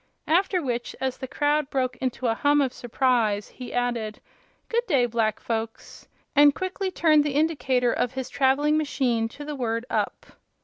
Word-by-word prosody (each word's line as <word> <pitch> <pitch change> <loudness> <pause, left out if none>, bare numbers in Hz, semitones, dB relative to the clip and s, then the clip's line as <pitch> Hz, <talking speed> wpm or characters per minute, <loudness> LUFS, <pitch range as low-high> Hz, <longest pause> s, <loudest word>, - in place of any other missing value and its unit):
After 365 +1 +2
which, 240 -2 -3
as 260 -1 -2
the 260 - -5
crowd 295 +1 0
broke 255 -2 -1
into 255 0 -3
a 230 - +3
hum 290 +5 +2
of 270 -3 +1
surprise, 235 -4 0
he 250 - -9
added: 240 -3 -2 0.5
"Good 475 +1 -1
day, 275 -9 +3
black 225 -2 0
folks!" 225 -1 -5 0.3
and 290 0 +6
quickly 375 +1 -3
turned 315 -5 +4
the 290 -2 -2
indicator 270 -6 +1
of 250 - -1
his 260 -1 -4
traveling 285 +3 +2
machine 245 -6 0
to 290 +5 -10
the 300 0 -5
word 230 -2 -2
"up." - - -2
260 Hz, 170 wpm, -25 LUFS, 240-295 Hz, 0.5 s, and